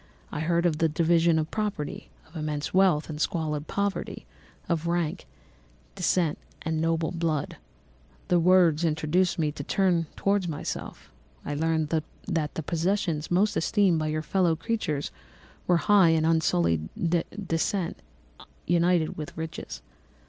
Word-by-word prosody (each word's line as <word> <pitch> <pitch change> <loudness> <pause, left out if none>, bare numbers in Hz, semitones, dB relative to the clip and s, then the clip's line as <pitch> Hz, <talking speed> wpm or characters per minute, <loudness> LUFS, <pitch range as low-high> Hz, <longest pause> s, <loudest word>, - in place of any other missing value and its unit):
I - - -4
heard 170 +2 +1
of 160 -3 +1
the 165 - +3
division 165 +1 +3
of 155 0 -1
property, 210 -9 -3 0.2
of 160 - -21
immense 150 -1 -3
wealth 185 -5 +3
and 155 -1 -5
squalid 155 -3 -1
poverty, 200 0 -2 0.4
of 170 -1 -1
rank, 170 0 -1 0.7
descent, 170 - +1 0.2
and 160 0 -1
noble 165 0 0
blood. 165 -4 -2 0.7
"The 175 - +3
words 175 -2 +4
induced 165 +3 +1
me 155 -3 +1
to 145 - -7
turn 175 -1 +1
towards 200 -2 +1
myself. 150 -3 -6 0.3
I 145 - -3
learned 160 0 0 0.4
that 160 -5 -2
the 160 - -3
possessions 170 -1 -1
most 195 +4 +2
esteemed 185 -1 +2
by 155 - -1
your 155 0 -2
fellow 175 -2 +2
creatures 160 -5 -2 0.6
were 175 - +4
high 195 -1 +5
and 160 -1 +3
unsullied 85 - +2 0.6
descent 170 +2 -1 0.7
united 170 -1 +2
with 155 0 -7
riches. 160 - -6
165 Hz, 135 wpm, -27 LUFS, 155-175 Hz, 0.7 s, high